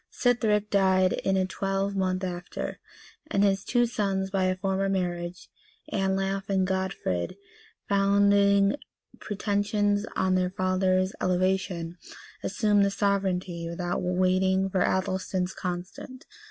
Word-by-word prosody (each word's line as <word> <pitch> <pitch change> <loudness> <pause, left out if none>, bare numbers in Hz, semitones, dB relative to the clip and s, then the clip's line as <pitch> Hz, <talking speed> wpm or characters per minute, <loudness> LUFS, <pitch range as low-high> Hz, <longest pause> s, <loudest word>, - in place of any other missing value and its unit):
Sithric 220 -4 +1
died 190 -2 +3
in 190 0 0
a 185 - +2
twelvemonth 195 -1 -1
after; 180 -1 -5 0.5
and 200 -10 +2
his 195 -1 +2
two 240 -1 +2
sons 195 -4 -1
by 190 -1 +1
a 185 0 +1
former 195 +1 -1
marriage, 175 -2 -3 0.5
Anlaf 195 0 -1
and 190 -1 +2
Godfrid, 190 - -2 0.5
founding 200 +2 +4 0.4
pretensions 205 0 0
on 190 0 +1
their 185 -1 +2
father's 185 +1 +1
elevation, 180 -2 0 0.4
assumed 205 0 +2
the 200 - +3
sovereignty, 190 -4 -1
without 175 +1 -2
waiting 185 +1 +1
for 185 -2 +1
Athelstan's 190 -1 0
consent. 180 +8 -6
190 Hz, 115 wpm, -27 LUFS, 185-200 Hz, 0.5 s, founding